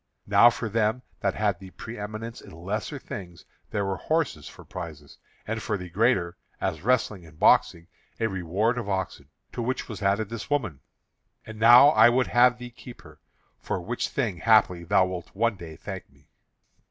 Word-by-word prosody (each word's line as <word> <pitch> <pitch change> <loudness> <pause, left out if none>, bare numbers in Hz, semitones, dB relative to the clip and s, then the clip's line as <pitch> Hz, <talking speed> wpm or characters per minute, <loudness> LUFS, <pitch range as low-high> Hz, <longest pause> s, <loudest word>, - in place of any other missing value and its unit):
Now 105 +3 +7
for 120 -1 -4
them 110 +3 0 0.2
that 100 -1 -1
had 105 -4 0
the 95 -1 -11
preëminence 110 +2 -7
in - - -14
lesser 100 - -5
things 90 -9 -9 0.2
there 100 -1 -1
were 95 -1 -2
horses 160 - -1
for - - -13
prizes; 75 -4 -9 0.3
and 110 +1 -3
for 105 - -2
the 90 -2 -9
greater, 95 -4 +1 0.2
as 80 - -2
wrestling 110 -4 0
and 80 -2 -16
boxing, 85 +1 +3 0.3
a 115 - +1
reward 100 +4 0
of 105 -4 -5
oxen, 95 -7 -3 0.2
to - - -4
which 130 +3 -2
was 105 -4 -8
added 100 +1 +1
this 115 +2 -7
woman. 110 - -1 0.7
And 110 -1 -10
now 120 +5 +8
I 150 - +6
would 125 +1 +2
have 120 0 +4
thee 125 0 -9
keep 120 0 -13
her, - - -16 0.4
for - - -3
which 115 +8 -3
thing, 115 -10 -2
haply, 100 -5 +3
thou 95 +2 +3
wilt 90 -1 -7
one 115 +1 +1
day 85 -4 -10
thank - - -8
me." - - -27
105 Hz, 180 wpm, -26 LUFS, 90-120 Hz, 0.7 s, now